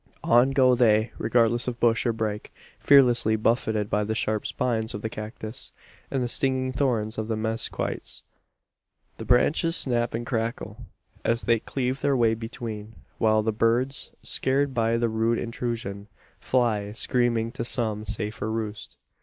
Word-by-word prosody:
On 120 +3 +5
go 130 -2 +4
they, 110 -2 +3
regardless 120 0 +2
of 120 -1 -3
bush 115 +1 +2
or - - +3
brake 110 -2 -4 0.3
fearlessly, 120 -5 +5
buffeted 110 -1 0
by 105 0 0
the 110 +1 -2
sharp 110 -1 -1
spines 110 -3 -2
of 105 - -7
the 110 - -2
cactus, 110 +3 -7 0.4
and 135 -2 -1
the - - -1
stinging 130 +1 0
thorns 115 -5 0
of 110 - -3
the 115 - -1
mezquites. 110 +1 -3 0.9
The - - -7
branches 160 +7 +3
snap 120 -6 +1
and 120 +1 -4
crackle, 115 -1 -4 0.4
as 115 0 0
they 115 -1 +2
cleave 130 +3 -3
their 140 -2 +2
way 115 -2 +3
between; 110 -1 -7 0.2
while 110 -1 +3
the 110 - +1
birds, 120 +5 0
scared 135 +1 0
by 115 -1 +1
the 120 0 +1
rude 115 +1 +1
intrusion, 115 -4 -4 0.3
fly 110 -5 0
screaming 115 -1 0
to 115 - -4
some 110 -3 -1
safer 105 0 -4
roost. 110 -2 -5
115 Hz, 155 wpm, -25 LUFS, 110-125 Hz, 0.9 s, On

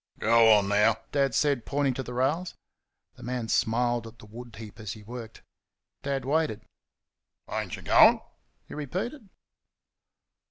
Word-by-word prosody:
"Go 115 0 +5
on, 100 -2 +3
now!" 105 +2 +3 0.2
Dad 135 -4 +1
said, 140 -1 +1
pointing 140 0 0
to 130 - -4
the 125 -1 -7
rails. 150 +8 -1 0.6
The - - -14
man 125 -2 -4
smiled 120 +1 +1
at 115 +1 -13
the - - -14
wood 120 +2 -11
heap 105 -4 -11
as 110 -2 -5
he 110 - -13
worked. 115 0 -9 0.6
Dad 135 -2 -3
waited. 150 -5 0 0.9
"Ain't - - -4
y' - - -11
going?" - - +6 0.5
he - - -10
repeated. 195 - -5
120 Hz, 150 wpm, -27 LUFS, 110-140 Hz, 0.9 s, going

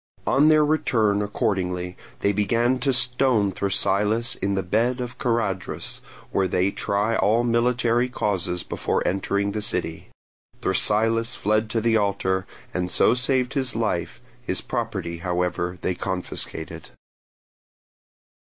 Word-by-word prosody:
On 140 +3 +4
their 155 -1 +5
return 110 -9 +2
accordingly 90 -4 -1 0.3
they 100 - +3
began 115 +5 +1
to 140 - +1
stone 125 -5 +2
Thrasylus 105 +5 +1
in 100 0 -1
the 95 - -1
bed 115 +7 +1
of 125 0 -5
the - - -9
Charadrus, 110 -6 -1 0.3
where 95 - +1
they 90 +2 +1
try 105 +4 0
all 110 +5 +3
military 120 +1 +2
causes 90 -6 -1
before - - -1
entering 100 +2 0
the 105 - -3
city. 105 - -3 0.5
Thrasylus 115 +5 +1
fled 110 +1 +1
to 115 0 0
the 115 0 +3
altar, 95 -2 0 0.3
and 90 0 -1
so - - +4
saved 125 0 +1
his 130 -3 0
life; - - -1 0.2
his - - -2
property 85 0 -3
however 90 0 -1
they 95 - 0
confiscated. 90 -3 -4
105 Hz, 130 wpm, -24 LUFS, 95-120 Hz, 0.5 s, their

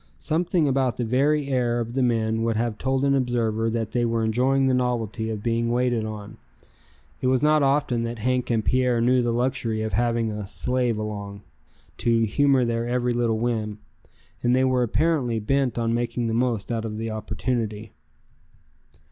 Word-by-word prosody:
Something 165 - 0
about 130 -2 +1
the 120 - -1
very 140 +5 +1
air 120 -3 +1
of 115 0 -4
the 135 - 0
men 115 -2 +1
would 115 0 0
have 115 -1 -2
told 135 0 0
an 140 0 +3
observer 115 -4 0
that 115 -1 -2
they 120 - 0
were 115 -1 0
enjoying 130 +5 +2
the 130 - +2
novelty 120 -3 -1
of 105 -2 -4
being 115 0 0
waited 120 -2 +1
on. 105 -1 -7 0.8
It 130 - 0
was 130 +1 +2
not 150 0 +4
often 135 -3 +1
that 115 0 -3
Hank 125 +3 -1
and 115 -2 0
Pierre 125 -2 +2
knew 125 +2 +3
the 120 - 0
luxury 120 -2 -1
of 110 - -4
having 115 0 +1
a 105 -2 -5
"slave" 125 +1 0
along, 100 -1 -6 0.5
to 115 -1 +2
humor 130 +4 +3
their 115 0 -1
every 125 0 0
little 120 -2 +1
whim; 110 -3 -2 0.6
and 120 +1 +2
they 130 - +3
were 130 -1 +2
apparently 125 -1 +1
bent 125 +2 0
on 115 -1 0
making 120 0 -1
the 115 - -1
most 115 -2 0
out 115 -1 -1
of 110 -1 -5
the 115 0 -3
opportunity. 110 -1 -3
120 Hz, 180 wpm, -24 LUFS, 110-130 Hz, 0.8 s, not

